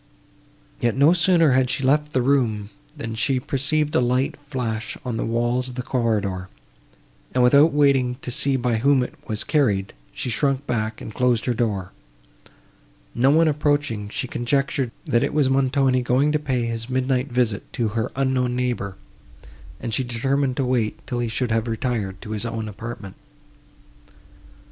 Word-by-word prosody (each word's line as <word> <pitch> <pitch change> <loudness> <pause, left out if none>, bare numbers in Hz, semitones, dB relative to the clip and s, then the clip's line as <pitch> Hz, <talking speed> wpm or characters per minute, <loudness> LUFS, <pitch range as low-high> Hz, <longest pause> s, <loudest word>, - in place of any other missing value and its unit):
Yet 120 +1 0
no 145 +5 +6
sooner 170 -3 +4
had 130 0 +3
she 135 - -2
left 150 +3 +2
the 130 -3 +1
room, 115 -6 +1 0.3
than 115 0 -5
she 130 +3 +1
perceived 150 +3 0
a 160 - +4
light 125 +2 +1
flash 125 -6 -4
on 125 -2 -2
the - - -2
walls 120 +2 0
of 125 - -9
the 125 - -3
corridor, 105 -8 -1 0.9
and, 125 - +4
without 140 +6 +6
waiting 140 -4 +3
to 125 - -4
see 135 +2 +2
by 120 -3 0
whom 135 +2 +3
it - - -6
was 110 -3 -1
carried, 105 -11 +1 0.2
she 125 - -4
shrunk 135 +3 0
back, 110 -3 -2
and 110 - -7
closed 125 -2 +1
her 125 - +1
door. 105 -6 -2 1.2
No 130 +3 +3
one 160 +3 +5
approaching, 145 -8 0
she 130 - -3
conjectured, 135 +2 0 0.2
that 120 - +2
it - - -2
was 140 -3 +3
Montoni 135 -1 +2
going 130 +4 +2
to 150 - +1
pay 130 -5 -1
his 115 +1 -4
midnight 130 +1 0
visit 120 -4 -1
to 115 -3 0
her 110 0 -2
unknown 130 -2 0
neighbour, 120 -6 -2 0.8
and 115 -3 -4
she 130 - +1
determined 130 +2 -1
to 135 - +1
wait, 120 -4 0
till 125 - -3
he 120 -1 -1
should 115 +1 -1
have 115 +1 0
retired 110 -4 -2
to 110 - -8
his 110 0 -2
own 115 -2 -3
apartment. 105 -2 -8
125 Hz, 170 wpm, -23 LUFS, 115-135 Hz, 1.2 s, no